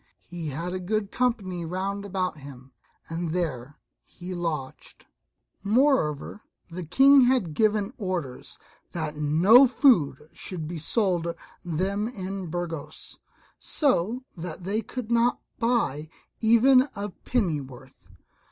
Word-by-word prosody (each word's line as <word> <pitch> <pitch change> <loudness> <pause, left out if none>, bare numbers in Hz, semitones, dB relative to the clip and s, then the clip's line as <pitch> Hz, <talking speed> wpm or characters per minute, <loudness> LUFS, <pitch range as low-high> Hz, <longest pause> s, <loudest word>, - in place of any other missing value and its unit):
He 170 -2 -7
had 165 +5 -4
a 185 - -3
good 205 +2 -2
company 200 -8 -1
round 195 +4 -3
about 185 -5 -2
him, 135 -2 -12 0.4
and 165 +1 -3
there 145 -6 -3 0.3
he 180 +1 -9
lodged 165 -6 -5 0.6
Moreover 210 - +1 0.3
the 180 +2 -5
King 270 - +6
had 245 -11 +1
given 210 - +1
orders 180 - -4 0.4
that 155 -3 -3
no 170 - +6
food 240 - +4 0.2
should 165 -5 -6
be 170 0 -5
sold 180 -1 0 0.4
them 190 +5 -1
in 195 -5 -5
Burgos, 165 -3 -6 0.4
so 250 - 0
that 175 0 -7
they 205 +5 -1
could 240 -1 -7
not 235 +1 +2 0.2
buy 230 - 0 0.3
even 255 +4 +5
a 205 +1 -4
pennyworth. 150 - -4
185 Hz, 115 wpm, -26 LUFS, 160-225 Hz, 0.6 s, King